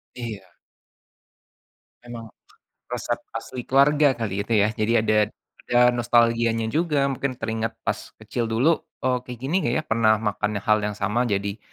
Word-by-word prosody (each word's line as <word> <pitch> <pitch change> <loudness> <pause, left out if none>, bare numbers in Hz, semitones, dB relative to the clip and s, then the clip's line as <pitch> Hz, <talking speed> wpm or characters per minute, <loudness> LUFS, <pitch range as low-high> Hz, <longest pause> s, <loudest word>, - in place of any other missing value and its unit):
Iya. 115 -5 -7 1.6
Emang, 120 -1 -8 0.6
resep - - -3 0.2
asli 125 - -5
keluarga 140 0 +4
kali 105 -4 -3
itu 115 - 0
ya 110 - +1
jadi 115 0 +1
ada 110 - +2 0.5
ada 120 - +2
nostalgianya 115 -1 +2
juga 155 -3 +1
mungkin 135 0 -3
teringat 115 -1 -3
pas - - -4
kecil 115 +2 -3
dulu, 125 +9 +2 0.2
eee, 130 -1 +2
kayak 125 -2 -7
gini 160 +8 +1 0.2
ya 155 - 0
pernah 115 -4 +3
makan 105 0 -2
hal 110 0 +3
yang 105 0 -3
sama 105 +5 0
jadi, 100 0 -2
115 Hz, 145 wpm, -24 LUFS, 110-125 Hz, 1.6 s, keluarga